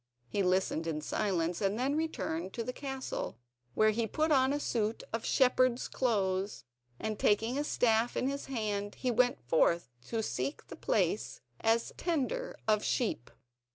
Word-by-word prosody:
He 200 Hz, -, -1 dB
listened 185 Hz, -3 st, +1 dB
in 155 Hz, -2 st, -1 dB
silence, 175 Hz, -1 st, -1 dB
and 200 Hz, +1 st, +1 dB
then 265 Hz, +4 st, +1 dB
returned 190 Hz, -, -2 dB
to 230 Hz, -, -3 dB
the 250 Hz, -, -4 dB
castle, 270 Hz, -, -4 dB, 0.4 s
where 215 Hz, 0 st, +5 dB
he 225 Hz, +1 st, 0 dB
put 310 Hz, +7 st, 0 dB
on 265 Hz, -2 st, +4 dB
a 290 Hz, -, 0 dB
suit 225 Hz, -5 st, -1 dB
of 225 Hz, 0 st, -1 dB
shepherd's 255 Hz, -1 st, +3 dB
clothes, 200 Hz, -5 st, 0 dB, 0.4 s
and 215 Hz, -1 st, -3 dB
taking 225 Hz, +4 st, +2 dB
a 290 Hz, -, 0 dB
staff 230 Hz, -4 st, +2 dB
in 255 Hz, -, +1 dB
his 280 Hz, +1 st, -3 dB
hand, 210 Hz, -5 st, -2 dB
he 255 Hz, -, -1 dB
went 245 Hz, +2 st, +3 dB
forth 170 Hz, -1 st, +3 dB, 0.2 s
to 225 Hz, -1 st, -1 dB
seek 280 Hz, -, -3 dB
a -, -, -5 dB
place -, -, 0 dB, 0.2 s
as 225 Hz, +1 st, +1 dB
tender 345 Hz, -, -1 dB
of 215 Hz, -1 st, +3 dB
sheep. 210 Hz, -, -1 dB
225 Hz, 160 wpm, -32 LUFS, 200-260 Hz, 0.4 s, where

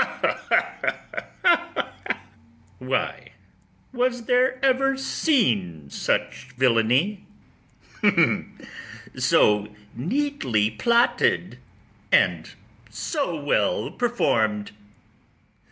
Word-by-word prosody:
ITHAMORE. 345 Hz, -1 st, +1 dB, 0.9 s
Why, -, -, -3 dB, 0.6 s
was 245 Hz, -1 st, 0 dB
there 255 Hz, +1 st, +2 dB
ever 270 Hz, +1 st, +2 dB
seen 105 Hz, -, 0 dB
such -, -, -2 dB
villany, 130 Hz, -, +2 dB, 1.9 s
So 105 Hz, 0 st, +3 dB, 0.3 s
neatly 135 Hz, -, 0 dB
plotted, 235 Hz, -, +1 dB, 0.5 s
and -, -, +3 dB, 0.4 s
so 285 Hz, -, -3 dB
well 110 Hz, -8 st, 0 dB
perform'd? 110 Hz, -, 0 dB
210 Hz, 55 wpm, -24 LUFS, -, 1.9 s, So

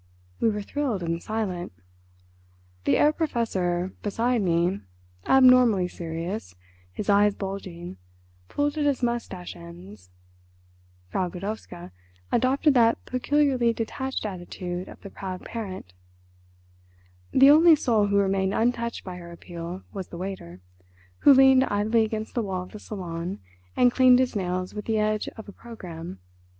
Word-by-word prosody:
We 230 Hz, -, +3 dB
were 210 Hz, -1 st, -3 dB
thrilled 245 Hz, -6 st, -2 dB
and 165 Hz, 0 st, -2 dB
silent. 200 Hz, -5 st, -3 dB, 1.1 s
The -, -, +3 dB
Herr 300 Hz, +1 st, +4 dB
Professor, 190 Hz, -, -1 dB
beside 230 Hz, +3 st, 0 dB
me, 175 Hz, 0 st, +1 dB, 0.5 s
abnormally 250 Hz, -8 st, +6 dB
serious, 170 Hz, -, -5 dB, 0.4 s
his 195 Hz, -, -6 dB
eyes 205 Hz, 0 st, +4 dB
bulging, 185 Hz, -, -6 dB, 0.5 s
pulled 290 Hz, -, -1 dB
at 295 Hz, -, +1 dB
his 280 Hz, -3 st, 0 dB
moustache 235 Hz, -7 st, -3 dB
ends. 170 Hz, -, -12 dB, 1.0 s
Frau 180 Hz, -, -1 dB
Godowska 180 Hz, -2 st, -7 dB, 0.4 s
adopted 270 Hz, +5 st, +3 dB
that 230 Hz, -3 st, +4 dB
peculiarly 255 Hz, -2 st, +1 dB
detached 260 Hz, +3 st, -4 dB
attitude 180 Hz, -2 st, -5 dB
of -, -, -12 dB
the 200 Hz, -, -10 dB
proud 185 Hz, -2 st, -7 dB
parent. 190 Hz, -, -7 dB, 1.4 s
The 270 Hz, +2 st, +7 dB
only 320 Hz, +2 st, +7 dB
soul 225 Hz, -7 st, +2 dB
who 200 Hz, 0 st, +1 dB
remained 195 Hz, 0 st, +1 dB
untouched 235 Hz, 0 st, -1 dB
by 180 Hz, -2 st, -7 dB
her 170 Hz, -1 st, -10 dB
appeal 170 Hz, +1 st, -8 dB
was 190 Hz, -3 st, -5 dB
the 170 Hz, -, -9 dB
waiter, 170 Hz, -, -7 dB, 0.6 s
who -, -, +7 dB
leaned 265 Hz, -1 st, +7 dB
idly 220 Hz, +2 st, +2 dB
against 220 Hz, 0 st, -4 dB
the 240 Hz, -, 0 dB
wall 190 Hz, -4 st, -3 dB
of 180 Hz, -, -13 dB
the 210 Hz, -, -9 dB
salon 180 Hz, -3 st, -5 dB, 0.4 s
and 245 Hz, 0 st, +5 dB
cleaned 255 Hz, 0 st, +6 dB
his 255 Hz, -2 st, 0 dB
nails 185 Hz, -1 st, -2 dB
with 210 Hz, -1 st, -6 dB
the 220 Hz, -1 st, 0 dB
edge 215 Hz, 0 st, 0 dB
of 220 Hz, -, -9 dB
a -, -, -8 dB
programme. 175 Hz, -, -9 dB
205 Hz, 140 wpm, -25 LUFS, 180-240 Hz, 1.4 s, The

